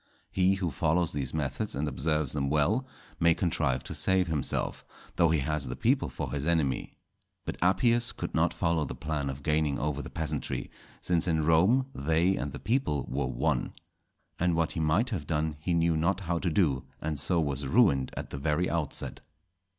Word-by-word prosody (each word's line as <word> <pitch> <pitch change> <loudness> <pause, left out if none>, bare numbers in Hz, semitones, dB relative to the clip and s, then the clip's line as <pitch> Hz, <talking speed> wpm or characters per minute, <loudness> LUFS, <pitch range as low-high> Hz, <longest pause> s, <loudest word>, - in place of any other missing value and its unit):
He 95 +1 +3
who 90 -4 -2
follows 80 +4 +1
these 70 -3 -2
methods 75 +6 -2
and 75 +2 -1
observes 75 +1 0
them 70 -2 -1
well, 95 - +2 0.3
may 85 -1 +4
contrive 65 -7 0
to - - -6
save 95 -1 +2
himself, 80 -4 -1 0.3
though 85 -2 +4
he 80 -3 +2
has 75 +1 -1
the - - -4
people - - +1
for - - -5
his 70 +1 -2
enemy. 80 -6 0 0.5
But - - -4
Appius 115 +7 +3
could - - -5
not - - +2
follow 85 -2 0
the - - -5
plan 75 -3 -2
of 70 +1 -6
gaining 75 -1 +1
over 75 -1 -2
the - - -8
peasantry, 75 -4 -3 0.3
since 85 -1 +1
in 80 -3 +1
Rome 95 - +4
they 80 +6 +2
and 70 - -3
the - - -6
people 110 - 0
were 70 +2 0
one. - - -1 0.7
And 90 -1 +2
what 80 -1 +1
he - - -4
might 85 +11 +2
have 80 -9 -3
done 80 -1 0
he 85 +3 0
knew 85 -1 +2
not 85 +5 +1
how 85 -2 -1
to 90 - 0
do, 75 -7 +2 0.2
and 75 -2 -3
so 85 +4 +2
was 70 -3 -1
ruined 70 - +4
at - - -5
the 70 - -5
very 80 +4 +1
outset. 80 -4 -3
80 Hz, 190 wpm, -29 LUFS, 75-90 Hz, 0.7 s, may